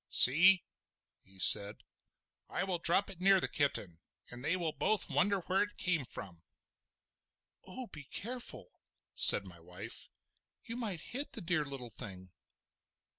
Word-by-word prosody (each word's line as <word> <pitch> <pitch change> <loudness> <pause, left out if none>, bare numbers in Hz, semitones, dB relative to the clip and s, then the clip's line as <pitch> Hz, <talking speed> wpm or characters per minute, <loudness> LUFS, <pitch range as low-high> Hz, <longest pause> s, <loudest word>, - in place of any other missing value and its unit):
"See!" 180 +8 +5 0.6
he 95 0 -22
said, 100 +3 +4 0.7
"I - - -3
will 185 -3 -3
drop 195 +4 +1
it 180 -2 -12
near 195 0 +4
the - - -1
kitten, 105 - -3 0.3
and 120 +1 -11
they 165 +6 -1
will 170 -3 -3
both 215 +6 -1
wonder 200 +1 0
where 185 +3 -1
it 205 0 -4
came 170 -7 -2
from." 90 -8 -11 1.3
"Oh, 250 +7 -8
be 150 -9 -12
careful," 245 - -8 0.4
said - - +7
my - - -14
wife; - - -5 0.5
"you 230 - -8
might 210 -9 -5
hit 275 +4 -3
the 225 - -3
dear 170 -3 -2
little 135 -4 -9
thing!" 95 -3 -11
175 Hz, 145 wpm, -32 LUFS, 125-195 Hz, 1.3 s, said